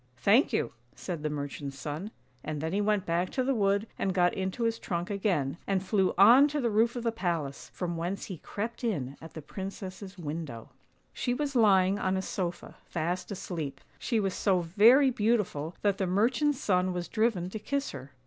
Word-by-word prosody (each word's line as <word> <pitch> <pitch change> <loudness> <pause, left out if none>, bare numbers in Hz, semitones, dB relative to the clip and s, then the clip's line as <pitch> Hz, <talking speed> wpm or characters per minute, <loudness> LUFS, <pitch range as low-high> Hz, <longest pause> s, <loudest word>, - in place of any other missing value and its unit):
" 125 - -37
Thank 220 - +4
you," - - 0 0.2
said 175 -5 -5
the 155 - -1
merchant's 140 -1 -5
son, 150 +8 -5 0.3
and 155 -1 -4
then 160 +3 -3
he 205 - +1
went 205 -2 +1
back 170 +2 0
to 260 - +1
the 270 +2 +1
wood 200 -2 +2
and 190 -2 0
got 180 -1 +3
into 190 +5 -2
his 230 0 0
trunk 175 +1 -3
again, 175 -8 0
and 195 -1 0
flew 190 -1 +2
on 245 +9 +8
to 295 0 -2
the 235 -4 0
roof 225 +3 +3
of 240 - -4
the 230 - +1
palace, 170 -10 -3
from 175 -2 -3
whence 175 +4 -3
he 185 -6 -7
crept 230 +8 -5
in 145 - -2
at 160 - -11
the 160 - -7
princess's 190 +1 -7
window. 150 -8 -6 0.4
She 245 - -1
was 285 0 -2
lying 200 -4 +4
on 190 -1 0
a 190 - -2
sofa, 175 -3 -4
fast 175 +2 -2
asleep. 165 -7 -5 0.2
She 230 -3 0
was 195 -3 0
so 190 -3 +2
very 225 - +6
beautiful 210 -9 0
that 200 -2 +2
the 190 - +1
merchant's 250 +9 +2
son 185 -6 +1
was 175 -1 -3
driven 215 -6 +1
to 220 - -4
kiss 280 +6 -2
her. 140 0 -9
190 Hz, 200 wpm, -29 LUFS, 170-220 Hz, 0.4 s, on